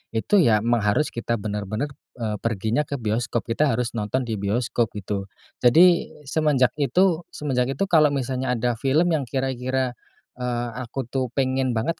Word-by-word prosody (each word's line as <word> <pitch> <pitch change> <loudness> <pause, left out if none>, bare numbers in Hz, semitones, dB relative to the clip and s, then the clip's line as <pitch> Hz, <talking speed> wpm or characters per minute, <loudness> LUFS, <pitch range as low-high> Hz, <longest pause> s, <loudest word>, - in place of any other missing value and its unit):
Itu 195 - +3
ya 110 - +4
mang 120 0 +2
harus 105 +9 +1
kita 115 0 -2
bener-bener, 105 +5 -3 0.2
eee, 110 -4 -3
perginya 115 +6 -1
ke 140 - -3
bioskop, 120 0 -1
kita 125 +6 +1
harus 120 0 -1
nonton 115 +4 -1
di 110 -4 -3
bioskop 115 +3 0
gitu. 100 -1 -4 0.3
Jadi 170 +8 +5 0.2
semenjak 145 -3 +2
itu 175 +3 +2
semenjak 135 -2 -1
itu 140 - 0
kalau 155 -3 +6
misalnya 130 -2 -1
ada 120 -1 -1
film 155 +7 +2
yang 145 -5 0
kira-kira, 130 0 -1 0.5
eee, 120 -1 -2
aku 125 +2 -4
tuh 130 -1 0
pengen 130 -2 0
banget 115 +9 -1
125 Hz, 160 wpm, -24 LUFS, 115-140 Hz, 0.5 s, kalau